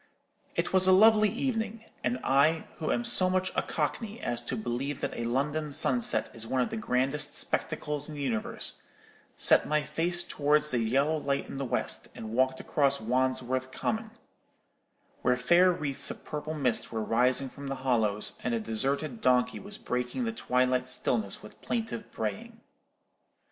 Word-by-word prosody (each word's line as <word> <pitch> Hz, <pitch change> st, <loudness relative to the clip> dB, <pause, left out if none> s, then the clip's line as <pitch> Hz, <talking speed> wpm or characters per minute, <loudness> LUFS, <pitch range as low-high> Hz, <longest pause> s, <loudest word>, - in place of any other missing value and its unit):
It -, -, -1 dB
was 185 Hz, 0 st, +6 dB
a -, -, +7 dB
lovely 215 Hz, +2 st, +6 dB
evening; 225 Hz, -2 st, -3 dB, 0.2 s
and 125 Hz, 0 st, 0 dB
I, 145 Hz, +4 st, +3 dB
who 155 Hz, -, -1 dB
am 240 Hz, -, 0 dB
so 185 Hz, -6 st, +5 dB
much 185 Hz, 0 st, 0 dB
a -, -, +2 dB
Cockney 225 Hz, -1 st, -3 dB
as 120 Hz, -1 st, -2 dB
to -, -, -2 dB
believe 140 Hz, -, -3 dB
that -, -, -2 dB
a 120 Hz, -, -3 dB
London 145 Hz, +5 st, -1 dB
sunset 240 Hz, +11 st, +2 dB
is 115 Hz, 0 st, -7 dB
one 130 Hz, -, 0 dB
of 125 Hz, -, 0 dB
the -, -, -3 dB
grandest 135 Hz, -, +1 dB
spectacles 150 Hz, 0 st, -2 dB
in 155 Hz, -, -7 dB
the 145 Hz, -, -6 dB
universe, 115 Hz, -5 st, -2 dB, 0.6 s
set -, -, +5 dB
my 150 Hz, 0 st, +1 dB
face 165 Hz, +4 st, 0 dB
towards 150 Hz, -1 st, +2 dB
the 125 Hz, -, +1 dB
yellow 135 Hz, +7 st, +1 dB
light 140 Hz, -2 st, -2 dB
in 135 Hz, -, -7 dB
the 135 Hz, -, -2 dB
west, 120 Hz, -, -1 dB
and 110 Hz, 0 st, -7 dB
walked 130 Hz, +2 st, +1 dB
across 140 Hz, -2 st, +2 dB
Wandsworth 130 Hz, +2 st, -1 dB
Common, 220 Hz, +9 st, -2 dB, 1.1 s
where 125 Hz, 0 st, +2 dB
faint 175 Hz, +7 st, +4 dB
wreaths 140 Hz, -3 st, -2 dB
of -, -, -9 dB
purple 155 Hz, +1 st, -5 dB
mist 130 Hz, -6 st, 0 dB
were 110 Hz, -1 st, -2 dB
rising 125 Hz, +4 st, +2 dB
from 140 Hz, +2 st, -9 dB
the 135 Hz, -, -3 dB
hollows, 110 Hz, -5 st, +1 dB
and 120 Hz, -1 st, 0 dB
a -, -, -1 dB
deserted 130 Hz, +4 st, 0 dB
donkey 125 Hz, -1 st, +2 dB
was 205 Hz, +1 st, -6 dB
breaking 125 Hz, -, -3 dB
the 230 Hz, -, -1 dB
twilight 125 Hz, -, 0 dB
stillness 115 Hz, -5 st, 0 dB
with 105 Hz, -, -11 dB
a -, -, -28 dB
plaintive 225 Hz, -2 st, -4 dB
braying. 105 Hz, -3 st, -5 dB
140 Hz, 175 wpm, -29 LUFS, 125-175 Hz, 1.1 s, a